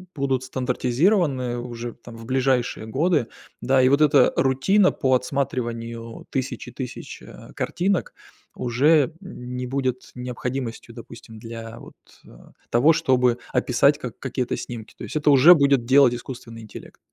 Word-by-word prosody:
будут 135 -3 -1
стандартизированы 130 - 0
уже 120 -1 -6
там 120 -1 -13
в 115 - -11
ближайшие 130 -3 0
годы, 145 +1 +1 0.3
да. 130 0 +3
И 130 - +4
вот 140 +2 +3
эта 150 -2 +5
рутина 185 +10 +3
по 130 -1 0
отсматриванию 120 -3 -3
тысячи 135 -1 -4
тысяч, 130 -3 -8
э, - - -13
картинок 185 +1 -1 0.4
уже 145 +5 +2
не 125 -9 -7
будет 130 -1 -3
необходимостью, 125 -1 -5
допустим, 115 -1 -12
для 115 +1 -9
вот, - - -14 0.3
э, - - -17 0.4
того, 135 +8 +5
чтобы 125 -5 +2 0.2
описать 125 +3 +2
как 125 -5 -7
какие-то 130 -2 -3
снимки. 115 -3 -8
То - - -9
есть - - -8
это 150 -1 +2
уже 145 +5 +8
будет 140 -6 +3
делать 130 0 +5
искусственный 120 -2 -9
интеллект. 110 - -12
130 Hz, 140 wpm, -23 LUFS, 120-140 Hz, 0.4 s, уже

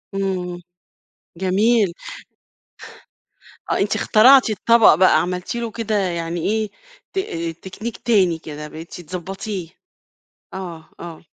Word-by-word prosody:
إمم. 180 -2 -2 0.8
جميل. 200 +1 +2 1.8
آه، - - +2
أنتِ - - 0
اخترعتِ 255 +3 +6
الطبق 220 -2 +5
بقى، 170 -3 +5
عملتِ 180 +4 -3
له 235 -2 -3
كده 220 -1 -2
يعني 170 -3 -1
إيه، 215 +3 0 0.4
ت 390 - 0 0.5
تكنيك 220 +5 -6
تاني 190 -8 +2
كده، 150 -1 -8
بقيتِ 165 +3 -9
تضبَطيه. 185 +2 -6 0.9
آه، 175 -4 -8
آه. 170 -2 -9
190 Hz, 105 wpm, -21 LUFS, 170-220 Hz, 1.8 s, اخترعتِ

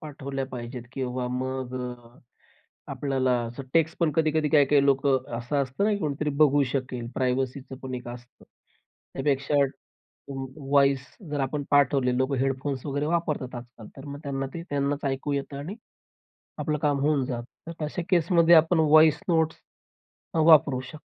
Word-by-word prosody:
पाठवल्या 140 -2 -5
पाहिजेत 125 -1 -7
किंवा 125 -2 -3
मग 130 0 -3
अ, 125 -1 -8 0.7
आपल्याला 135 -2 0 0.4
टेक्स्ट 165 0 +2
पण 165 -3 +2
कधी-कधी 155 -1 +2
काही, 145 -2 +5
काही 140 0 +4
लोकं 135 -1 +2
असं 120 +5 -3
असतं 135 +8 -2
ना, 215 - +3
की 205 - 0
कोणीतरी 150 -3 -2
बघू 145 -1 +5
शकेल. 125 -3 -3
प्रायव्हसीच 130 +1 -1
पण 130 -1 -5
एक 125 -1 -6
असतं. 120 0 -11 0.7
त्यापेक्षा 140 +1 0 1.2
वॉईस 140 -2 +4 0.2
जर 145 -1 -1
आपण 140 +2 -1
पाठवले 135 -3 +3
लोक 130 +2 0
हेडफोन्स 135 +1 -2
वगैरे 145 +1 -1
वापरतात 155 -6 -1
आजकाल, 120 -2 -10
तर 135 - -10
मग 140 0 -7
त्यांना 135 -2 -3
ते 170 - -5
त्यांनाच 140 0 -1
ऐकू 135 +1 -2
येतं 140 0 -3
आणि 155 +8 -6 0.8
आपलं 150 -1 -1
काम 145 -2 +1
होऊन 145 -2 +2
जातं. 125 +6 -7
तर - - -3
अशा 155 +4 -4
केसमध्ये 170 -1 +5
आपण 165 +1 +5
व्हॉईस 155 -1 +6
नोट्स 160 -2 +2 0.8
अ, - - +2
वापरू 155 -5 +6
शकतो. 155 - -10
140 Hz, 155 wpm, -26 LUFS, 130-150 Hz, 1.2 s, व्हॉईस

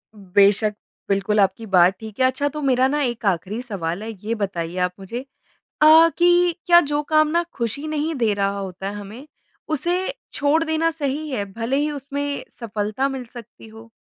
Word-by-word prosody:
बेशक़, 200 +2 +3 0.4
बिल्कुल 200 +2 +1
आपकी 195 +3 +1
बात 185 -2 +4
ठीक 220 0 -10
है। 260 - +4
अच्छा 260 +3 +1
तो 300 +2 -6
मेरा 260 -2 +3
ना 295 +2 0
एक 240 -3 -3
आखिरी 195 +4 -1
सवाल 195 -5 -4
है, 225 - -6
ये 215 +2 -4
बताइए 180 -5 -3
आप 180 - -15
मुझे 235 +7 -6 0.6
अ, 320 +2 +8
कि 350 0 +4
क्या 345 -1 +7
जो 295 -2 0
काम 310 +1 +3
ना 340 +3 +1
खुशी 235 +5 -3
नहीं 310 +1 -1
दे 230 -5 +1
रहा 200 0 -1
होता 190 0 -6
है - - -6
हमें, 210 +7 -9 0.4
उसे 350 - -1 0.2
छोड़ 290 +3 +2
देना 320 +1 +1
सही 300 -1 -3
है? 255 -7 -2
भले 230 +4 -2
ही 295 +1 +1
उसमें 285 0 -4
सफलता 220 +2 -2
मिल 265 -2 -5
सकती 235 -2 -12
हो? 220 +1 -14
240 Hz, 185 wpm, -22 LUFS, 205-295 Hz, 0.6 s, अ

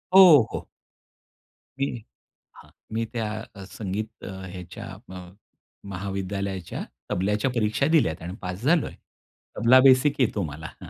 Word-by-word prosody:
हो, 175 -8 +10
हो. - - -5 1.1
मी 140 - +2 0.7
हां, - - -16 0.2
मी 115 +1 0
त्या 115 -2 -1 0.3
अ, 100 - -9
संगीत 105 +3 -5
अ, - - -6 0.2
ह्याच्या 90 0 -8 0.2
म 95 - -7 0.7
महाविद्यालयाच्या 95 -1 -4 0.3
तबल्याच्या 105 +7 +1
परीक्षा 110 +1 +1
दिल्यात 135 - +2
आणि 85 +2 -6
पास 90 +1 -5
झालो 165 +3 +3
आहे. - - -10 0.6
तबला 125 +3 +6
बेसिक 135 +2 +5
येतो 110 -4 +1
मला. 80 0 -6 0.2
हां. - - -9
105 Hz, 130 wpm, -25 LUFS, 95-130 Hz, 1.1 s, हो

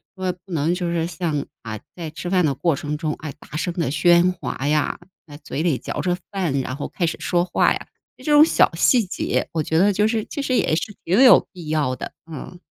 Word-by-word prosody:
说 185 -1 -1
不 190 - -14
能 165 +1 +1
就 175 -2 -2
是 165 -1 0
像， 160 -4 -2 0.2
啊， 110 -2 -5 0.2
在 165 -3 -6
吃 170 +3 -6
饭 180 -2 +3
的 145 - +1
过 150 +3 +1
程 150 +2 -4
中， 155 -1 -2
哎， 150 -3 -7
大 - - -12
声 175 +2 -2
的 165 -7 0
喧 175 +3 +4
哗 145 -5 -4
呀， 150 0 +1 0.3
在 145 -2 -11
嘴 150 0 -5
里 165 -7 +2
嚼 - - -4
着 180 -1 0
饭， 175 -9 -1
然 130 0 -3
后 140 - -5
开 175 - -1
始 165 - -2
说 175 -1 +1
话 180 - +2
呀。 - - -7 0.3
这 - - -15
种 295 -1 +7
小 - - +3
细 230 +6 +4
节 185 - -1
我 160 - 0
觉 160 - 0
得 200 +4 +5
就 210 +2 +2
是 220 -1 -1
其 285 - -5
实 265 -2 0
也 155 - +2
是 205 +6 -3
挺 190 +8 +3
有 255 - +7
必 170 -5 -9
要 150 -5 0
的。 - - -7 0.2
嗯。 165 +3 -8
170 Hz, 255 characters per minute, -22 LUFS, 150-185 Hz, 0.3 s, 种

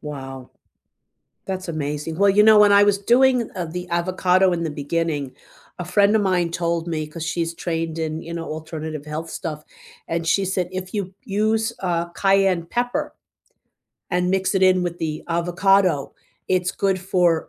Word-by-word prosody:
Wow. 135 -3 -8 1.0
That's 185 -2 -4
amazing. 150 0 -3
Well, 200 0 +5
you 205 +2 +5
know, 215 0 +7
when 205 -1 +6
I 200 0 +7
was 205 -1 +3
doing, 245 +2 +3
uh, 180 -2 -3
the 180 +2 -6
avocado 185 +1 +2
in 170 -1 -1
the 160 - -2
beginning, 145 -2 -2 0.5
a 180 - -4
friend 200 +3 +3
of 215 - +2
mine 180 -3 +1
told 170 0 -2
me- 155 -2 -2
'cause 160 +1 -7
she's 165 0 -2
trained 165 -1 -3
in, 160 0 -3
you 170 - -8
know, 165 - -4
alternative 155 -1 -6
health 155 +2 -5
stuff- 155 -4 -5 0.5
and 165 0 -2
she 195 +4 +2
said 185 -2 -1
if 185 +1 -6
you 195 -2 -3
use, 220 +3 0
uh, 170 -2 -1
cayenne 195 -2 +2
pepper 245 +6 -2 1.0
and 180 0 +1
mix 190 +1 0
it 190 - +2
in 185 -1 +4
with 175 -1 -3
the 155 -2 -4
avocado, 175 -2 +2 0.3
it's 180 -1 +1
good 190 -1 0
for 175 -3 +1
175 Hz, 170 wpm, -22 LUFS, 165-195 Hz, 1.0 s, know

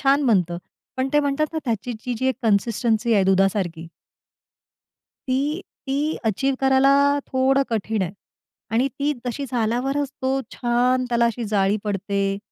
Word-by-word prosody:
छान 280 +1 +3
बनतं. 180 -7 +2 0.4
पण 260 +1 0
ते 295 - +5
म्हणतात 285 +1 0
ना, 320 - -1
त्याची 235 0 -2
जी 250 - -2
जी 260 - 0
एक 260 - +1
कन्सिस्टन्सी 225 +1 +1
आहे 195 -2 +4
दुधासारखी. 190 -3 +1 1.4
ती, 285 +7 0 0.3
ती 290 +4 0
अचीव्ह 265 +6 0
करायला 265 +1 +4 0.3
थोडं 270 +1 +2
कठीण 220 -1 -1
आहे 185 0 -3 0.6
आणि 250 +4 +3
ती 290 +1 +1
तशी 245 +4 -3
झाल्यावरच 255 +4 0
तो 265 +1 +1
छान 250 +1 +1
त्याला 235 -1 +2
अशी 235 0 -2
जाळी 200 -1 +1
पडते 200 -1 -1
240 Hz, 145 wpm, -23 LUFS, 205-270 Hz, 1.4 s, ते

